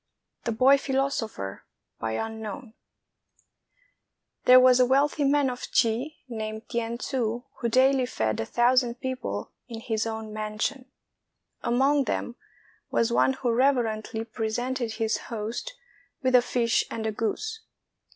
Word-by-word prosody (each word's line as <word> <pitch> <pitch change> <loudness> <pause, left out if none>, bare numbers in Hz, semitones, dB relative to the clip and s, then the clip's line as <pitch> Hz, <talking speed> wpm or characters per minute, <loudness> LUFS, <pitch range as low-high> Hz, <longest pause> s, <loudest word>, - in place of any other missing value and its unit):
THE 235 - 0
BOY 260 +5 +5
PHILOSOPHER 265 - -2 2.8
There 255 0 +9
was 255 0 +6
a 250 - +6
wealthy 285 +3 +2
man 285 0 +3
of 250 -1 -4
Chi, 245 +6 0
named 220 -1 -5
T'ien 235 -1 -2
Tsu, 240 -2 -2 0.2
who 235 - 0
daily 260 +1 +4
fed 110 - -1
a 110 - -1
thousand 245 0 +2
people 250 - -4 0.2
in 230 -3 -7
his 225 -1 -2
own 220 -1 -5
mansion. 215 +5 -3 0.7
Among 270 +3 +2
them 240 - -2 0.5
was 230 0 +1
one 265 - +4
who 255 -2 -1
reverently 230 -3 +1
presented 235 +2 -2
his 220 0 0
host 230 - -4 0.5
with 255 0 +2
a 250 - +8
fish 240 -1 +1
and 220 - -4
a 220 - 0
goose. 430 - -3
240 Hz, 125 wpm, -26 LUFS, 220-260 Hz, 2.8 s, There